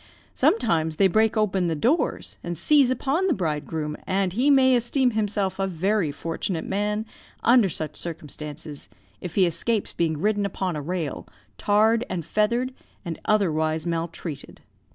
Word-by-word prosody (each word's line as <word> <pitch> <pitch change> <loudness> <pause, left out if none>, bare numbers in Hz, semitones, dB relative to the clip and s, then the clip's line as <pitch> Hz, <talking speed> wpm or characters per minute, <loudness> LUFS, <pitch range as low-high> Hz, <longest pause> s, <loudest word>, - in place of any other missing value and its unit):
Sometimes 160 - +2
they 195 - +4
break 220 +4 +2
open 195 -4 +1
the 165 - 0
doors, 245 - 0
and 175 -1 -4
seize 285 -4 +4
upon 275 +8 0
the 335 - +2
bridegroom; 150 -2 -3
and 190 -1 0
he 255 +7 +2
may 265 -2 +5
esteem 245 +2 +2
himself 205 -3 -1
a 195 - +1
very 185 -1 0
fortunate 165 +3 -4
man, 210 +2 -1 0.4
under 235 -4 +5
such 155 -2 -5
circumstances, 150 -2 -7 0.3
if 175 - -6
he 190 - +5
escapes 195 +6 -1
being 160 -2 0
ridden 205 +4 +1
upon 190 -3 -2
a 150 - -3
rail, 165 -1 -4 0.3
tarred 220 +3 +3
and 170 -4 -3
feathered, 235 +7 0 0.3
and 165 -2 -5
otherwise 160 -6 +1
maltreated. 165 -3 -5
190 Hz, 150 wpm, -24 LUFS, 160-220 Hz, 0.4 s, may